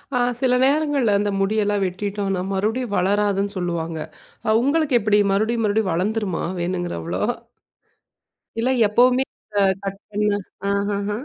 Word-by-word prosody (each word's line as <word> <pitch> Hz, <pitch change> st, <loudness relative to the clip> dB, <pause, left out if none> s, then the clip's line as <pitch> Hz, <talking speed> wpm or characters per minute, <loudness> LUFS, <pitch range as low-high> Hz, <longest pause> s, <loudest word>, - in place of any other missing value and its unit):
ஆ -, -, +2 dB, 0.2 s
சில 250 Hz, -1 st, +3 dB
நேரங்கள்ல 280 Hz, -7 st, +2 dB
அந்த 205 Hz, 0 st, 0 dB
முடியெல்லாம் 205 Hz, 0 st, +1 dB
வெட்டிட்டோம்ன்னா 195 Hz, 0 st, -2 dB
மறுபடியும் 215 Hz, +3 st, -1 dB
வளராதுன்னு 200 Hz, +1 st, +1 dB
சொல்லுவாங்க. 165 Hz, -2 st, -2 dB, 0.5 s
அ -, -, +2 dB
உங்களுக்கு 285 Hz, -1 st, +2 dB
எப்டி? 210 Hz, 0 st, +3 dB
மறுபடியும் 225 Hz, +3 st, +1 dB
மறுபடியும் 205 Hz, -3 st, +1 dB
வளர்ந்துருமா, 200 Hz, +1 st, -1 dB, 0.2 s
வேணுங்குறவ்ளோ? 175 Hz, -, -3 dB, 1.4 s
இல்ல 250 Hz, +3 st, +1 dB, 0.2 s
எப்பவுமே 250 Hz, +4 st, +4 dB, 0.4 s
அ -, -, +5 dB, 0.2 s
கட் 195 Hz, +1 st, -5 dB
பண்ண 210 Hz, 0 st, +1 dB, 0.4 s
ஆஹஹ. 200 Hz, 0 st, -1 dB
205 Hz, 115 wpm, -22 LUFS, 195-230 Hz, 1.4 s, அ